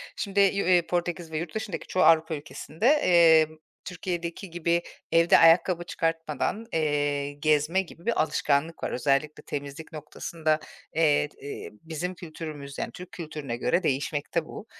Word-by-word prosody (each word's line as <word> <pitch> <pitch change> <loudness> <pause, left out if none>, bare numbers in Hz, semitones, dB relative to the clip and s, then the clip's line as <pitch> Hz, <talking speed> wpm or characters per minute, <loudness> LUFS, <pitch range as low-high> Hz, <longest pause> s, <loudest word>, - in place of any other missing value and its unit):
Şimdi, 200 -1 -2
eee, 190 -3 +4
Portekiz 175 -2 -2
ve 155 - -2
yurt 165 +4 -5
dışındaki 205 -6 -4
çoğu 185 - +1
Avrupa 160 -1 +4
ülkesinde, 150 +5 -6 0.2
eee, 165 -3 +6 0.4
Türkiye'deki 175 0 -4
gibi 170 0 0 0.3
evde 165 +1 +6
ayakkabı 170 +1 +5
çıkartmadan, 165 - -2
eee, 145 -2 0
gezme 155 +5 +2
gibi 170 0 -13
bir 235 - +2
alışkanlık 150 +1 0
var. - - -1
Özellikle 145 +3 0
temizlik 145 +2 -6
noktasında, 155 +1 -2 0.4
eee, 150 -2 +3
eee, 140 - -7
bizim 165 +3 -4
kültürümüz 155 -4 -8
yani - - -3
Türk 180 0 -10
kültürüne 150 -9 -6
göre 170 +9 +1
değişmekte 145 +3 -1
bu. 210 - -9
160 Hz, 140 wpm, -27 LUFS, 150-175 Hz, 0.4 s, eee